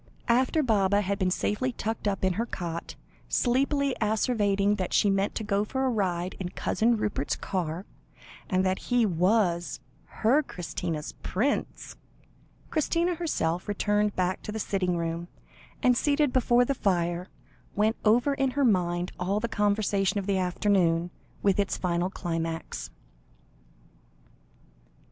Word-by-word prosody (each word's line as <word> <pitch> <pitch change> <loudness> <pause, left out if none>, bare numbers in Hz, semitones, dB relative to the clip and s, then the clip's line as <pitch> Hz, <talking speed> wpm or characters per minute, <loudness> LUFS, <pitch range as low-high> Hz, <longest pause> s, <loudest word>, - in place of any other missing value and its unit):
After 260 +6 +3
Baba 205 -4 +3
had 200 0 -2
been 185 - +2
safely 210 +7 0
tucked 220 -1 -3
up 195 -2 0
in 185 - +2
her 230 +6 -2
cot, 170 -4 -5 0.3
sleepily 275 +2 +1
asseverating 210 -2 +2
that 185 -2 -3
she 205 - +4
meant 195 +1 0
to 220 - -2
go 200 0 +1
for 265 +5 -2
a 260 - +2
ride 185 -5 -1
in 180 -2 -3
Cousin 230 +4 +1
Rupert's 205 -10 -1
car, 180 -1 -3 0.6
and 185 -1 +2
that 185 0 +1
he 245 -2 +4
was 180 -1 +1 0.4
"her 255 +8 +5
Christina's 170 - -4
prince," 245 +10 -2 0.7
Christina 335 +3 +1
herself 180 - -1
returned 205 0 +1
back 185 +1 0
to - - -6
the 220 - -4
sitting 185 -4 0
room, 170 +1 -3 0.6
and, 250 -1 +5
seated 290 +1 +2
before 245 -1 +4
the 275 - 0
fire, 175 -5 0 0.5
went 215 +2 +2
over 240 +6 +4
in 270 -1 +1
her 285 - +3
own 240 - +6
mind 175 -1 0
all 190 +3 0
the 235 - -1
conversation 205 -2 +1
of 200 - -2
the 195 -1 +1
afternoon, 180 -2 +1 0.3
with 200 -1 +3
its 200 - 0
final 175 0 0
climax. 165 -3 -4
200 Hz, 145 wpm, -27 LUFS, 180-235 Hz, 0.7 s, own